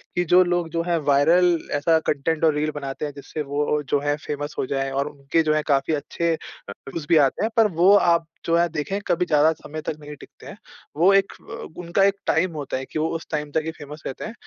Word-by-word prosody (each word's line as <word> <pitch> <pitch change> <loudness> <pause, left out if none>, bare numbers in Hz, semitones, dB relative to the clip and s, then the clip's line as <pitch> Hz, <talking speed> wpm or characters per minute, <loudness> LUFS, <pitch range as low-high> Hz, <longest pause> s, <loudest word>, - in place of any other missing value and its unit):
कि 175 - +2
जो 185 - +8
लोग 175 -2 -1
जो - - +2
है 170 - +2
वायरल 170 +5 +4 0.2
ऐसा 160 +3 +3
कंटेंट 155 +3 0
रील 150 +1 -1
बनाते 140 +1 -4
हैं 145 - -6
जिससे 145 +2 -6
वो 150 +1 -1
जो 145 - +2
है 145 +1 0
फ़ेमस 145 0 -4
हो - - 0
जाए 135 +1 -2
और 140 +1 -1
उनके 140 +3 -1
जो 155 -1 +2
है 155 - +1
काफ़ी 140 +2 +1
अच्छे 165 +3 -1 0.4
व्यूज़ 145 +8 -8
भी 170 - +6
आते 140 +5 +2
हैं, 220 - +1
पर 225 -1 +6
वो 190 +3 +7
आप 170 -4 +3 0.2
जो 165 - +2
है 170 +1 +3
देखें, 160 +6 -3
कभी 180 -1 +1
ज़्यादा 155 -1 +4
समय 155 0 -8
तक - - -2
नहीं 150 0 -9
टिकते - - -15
हैं। - - -10 0.4
वो 175 +5 +5
एक 195 0 +2 0.4
उनका 175 +2 0
एक 200 0 +3
टाइम 175 +2 +2
होता 145 -4 -4
है 130 - -5
कि - - -2
वो 155 - +1
उस 165 - -6
टाइम 150 -1 -3
तक 160 - +1
ही 160 - -2
फ़ेमस 150 0 -11
रहते 135 - -5
हैं, 220 - -6
155 Hz, 235 wpm, -23 LUFS, 145-170 Hz, 0.4 s, जो